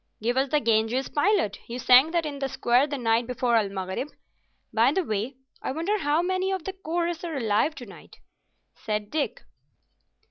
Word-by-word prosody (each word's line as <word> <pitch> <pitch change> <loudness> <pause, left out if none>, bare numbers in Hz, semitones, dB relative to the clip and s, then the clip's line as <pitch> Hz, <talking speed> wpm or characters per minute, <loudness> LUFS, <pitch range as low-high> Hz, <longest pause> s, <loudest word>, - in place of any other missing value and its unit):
"Give 235 +3 0
us 265 +1 +1
the 300 - +3
"Ganges 225 +2 +1
Pilot"; 290 - +1
you 235 - -5
sang 255 +4 +6
that 335 -1 0
in 285 -2 -5
the 270 -1 -2
square 260 0 +2
the 285 -1 -4
night 230 -1 +1
before 250 -1 0
El 215 -3 +2
Maghrib. 190 +6 -4 0.7
By - - +4
the 380 - 0
way, 220 +1 -3 0.3
I - - -3
wonder 340 +9 -1
how 300 +1 +1
many 375 +1 0
of 380 -3 -2
the 385 - -4
chorus 345 -2 -3
are 330 -4 -3
alive 230 +6 +1
to 250 - -8
night," 200 - -14 0.6
said 210 -1 -4
Dick. 305 -2 -2
270 Hz, 185 wpm, -26 LUFS, 230-320 Hz, 0.7 s, sang